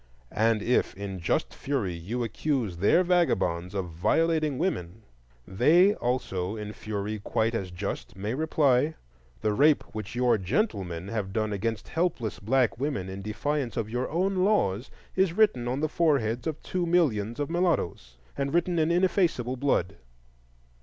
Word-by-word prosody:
And 110 0 +2
if 125 - +1
in 95 -1 -5
just 85 - -1
fury 130 -10 -2
you 100 +9 -3
accuse 115 - -1
their 105 - +4
vagabonds 95 - +1
of 95 -3 -2
violating 155 - +1
women, 110 - -2 0.4
they 165 - +5
also 110 - -2
in 105 -1 -6
fury 105 0 -4
quite 110 +3 0
as 95 -5 -2
just 90 +2 -5
may 105 +4 -3
reply: 150 -1 +2 0.5
The 105 - +1
rape 145 +6 +4
which 110 0 -6
your 125 -3 +3
gentlemen 95 - -1
have 105 -4 -3
done 110 -1 0
against 110 +2 -3
helpless 160 - -1
black 115 -1 +1
women 130 -10 -2
in 95 +1 -6
defiance 125 +5 -2
of 110 -1 -2
your 125 +2 -2
own 190 +4 0
laws 160 - +1 0.3
is 190 -3 +2
written 175 - +3
on 130 +4 -1
the 155 - +2
foreheads 140 -7 +1
of 155 -1 -4
two 180 -2 -2
millions 120 - +1
of 145 +2 -2
mulattoes, 160 - -1 0.2
and 140 +2 -2
written 175 0 +2
in 155 0 +2
ineffaceable 170 - +1
blood. 130 -9 0
120 Hz, 155 wpm, -27 LUFS, 100-155 Hz, 0.5 s, they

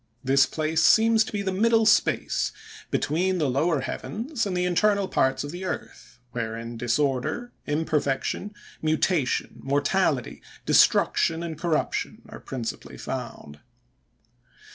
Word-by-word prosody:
This 135 0 +4
place 160 +1 0
seems 225 +4 +5
to 250 - -8
be 205 -1 -2
the 190 - -1
middle 225 +3 +3
space, 215 - +2 0.4
between 180 +5 0
the 155 -4 +1
lower 140 +3 +1
heavens 230 - -3
and 185 -2 -2
the 180 - +1
internal 200 +2 +2
parts 130 -5 +1
of 145 - -6
the 175 +2 -7
earth, 185 - -6
wherein 115 0 -4
disorder, 140 - -1 0.2
imperfection, 150 +4 -1 0.3
mutation, 155 -2 0
mortality, 145 0 0 0.2
destruction, 165 0 +3
and 165 -2 -4
corruption, 160 -1 -2
are - - -9
principally 120 -4 -6
found. 75 0 -6
160 Hz, 120 wpm, -25 LUFS, 135-190 Hz, 0.4 s, seems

